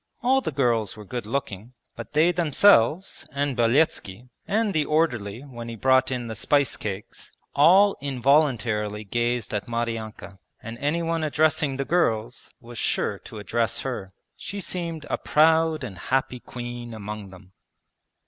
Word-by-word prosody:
All 265 +2 +3
the - - -3
girls 120 -7 0
were 105 - -10
good 120 +1 -5
looking, 115 -2 -4 0.2
but 115 +5 -9
they 160 +4 +4
themselves 170 - +3
and 140 -1 -1
Beletski, 120 -3 +1 0.2
and 215 -1 +1
the 155 -2 +2
orderly 125 -9 0
when 120 -4 -8
he 115 - -6
brought 130 +3 +3
in 125 -2 -3
the 115 - -5
spice 140 +5 +1
cakes, 105 -1 -7 0.2
all 190 +8 +6
involuntarily 120 -6 +1
gazed 120 +2 -1
at 105 -2 -2
Maryanka, 115 -4 -4 0.2
and 115 +1 -8
anyone 165 +2 0
addressing 150 -2 +1
the 140 - -2
girls 120 -9 0
was 120 -2 -10
sure - - -1
to - - -11
address 115 +2 -1
her. 120 -8 -5 0.2
She 200 - -6
seemed 170 -4 -4
a - - -2
proud 160 0 +3
and 100 -8 -7
happy 130 +3 -1
queen 120 -1 -7
among 105 -1 -6
them. 95 0 -15
125 Hz, 150 wpm, -25 LUFS, 110-155 Hz, 0.2 s, all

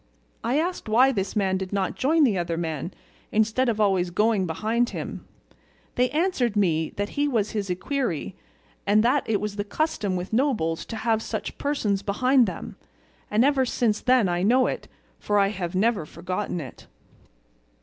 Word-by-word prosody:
I 250 +4 +1
asked 345 -6 -2
why 250 +5 +5
this 200 -4 -3
man 190 -2 +1
did 185 -1 -5
not 195 -2 -1
join 315 +4 +2
the 235 -8 +3
other 170 -2 -2
man, 160 0 -3 0.4
instead 220 +4 +2
of 220 -2 -1
always 190 -4 +2
going 210 +1 +1
behind 225 +8 0
him; - - -6 0.7
they 250 0 +2
answered 290 - 0
me 165 -6 +1
that 205 +1 -2
he 290 0 0
was 220 -7 0
his 205 -3 -3
equerry, 180 - -2 0.5
and 210 +2 +4
that 255 +3 +3
it 210 -2 +2
was 210 -1 -4
the 205 - -1
custom 210 - -1
with 180 +3 -5
nobles 220 - 0
to 230 - -5
have 225 0 0
such 220 -1 -5
persons 220 -9 0
behind 250 +5 +3
them, 185 - -6 0.5
and 220 +4 +3
ever 280 -2 +3
since 230 -3 0
then 250 -5 +4
I 175 0 0
know 245 +7 +4
it, - - -3 0.3
for 205 - 0
I 200 -1 +4
have 185 -4 -4
never 200 -4 +1
forgotten 180 +3 -4
it." 135 -6 -10
215 Hz, 175 wpm, -25 LUFS, 185-250 Hz, 0.7 s, why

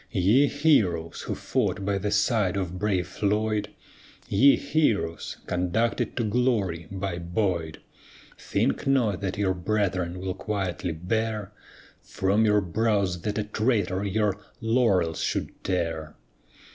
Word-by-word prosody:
Ye 110 +8 +4
heroes 115 - +2
who - - -4
fought 100 - -1
by 100 -1 0
the 105 +2 -2
side 105 -2 +2
of 90 -1 -3
brave 95 -4 0
Floyd, 105 +2 0 0.6
Ye 135 +8 +6
heroes, 130 - 0
conducted 110 +7 -1
to 120 - +1
glory 105 -8 0
by 95 -2 -3
Boyd, 85 -2 -2 0.6
Think - - -1
not 120 -9 +2
that 95 -2 -3
your 100 -2 +1
brethren 90 -2 -1
will 95 0 -3
quietly 95 -4 -3
bear, 105 +4 -2 0.5
From 100 +4 +1
your 105 -1 +4
brows 100 -1 0
that 105 +2 -2
a 105 - 0
traitor 105 -3 0
your 105 0 0 0.2
laurels 110 -8 +2
should - - -3
tear. 85 -4 -2
100 Hz, 125 wpm, -26 LUFS, 90-110 Hz, 0.6 s, Ye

